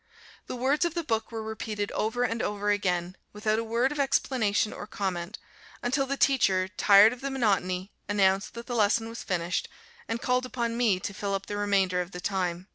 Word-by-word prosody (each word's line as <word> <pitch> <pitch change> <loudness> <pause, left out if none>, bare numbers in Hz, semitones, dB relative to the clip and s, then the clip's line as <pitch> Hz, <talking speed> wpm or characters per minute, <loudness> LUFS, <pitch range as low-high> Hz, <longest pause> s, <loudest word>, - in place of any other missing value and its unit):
The - - -4
words 265 +6 +1
of 340 -1 -1
the 340 - -1
book 225 -5 -1
were 225 -1 -4
repeated 215 -1 -4
over 225 +3 -1
and 230 -1 -1
over 205 0 0
again, 180 -3 0 0.2
without 215 +1 0
a - - -1
word 235 +4 +1
of 295 - -5
explanation 250 -6 +1
or - - -8
comment, 190 -2 -3 0.5
until 270 +3 +1
the 275 +1 -2
teacher, 195 -10 +3
tired 200 +3 +6
of 250 - -11
the 275 - -2
monotony, 195 -7 0 0.2
announced 195 0 +2
that 235 0 -7
the 245 - -5
lesson 225 +1 +2
was 230 - -7
finished, 175 0 -2 0.4
and 225 - -2
called 250 +1 0
upon 235 -2 -2
me 225 -6 +2
to 200 - -5
fill 200 0 -2
up 195 - -4
the 205 - -5
remainder 195 -3 +1
of 180 +1 -7
the 180 - -5
time. 180 -1 -2
210 Hz, 200 wpm, -28 LUFS, 195-240 Hz, 0.5 s, tired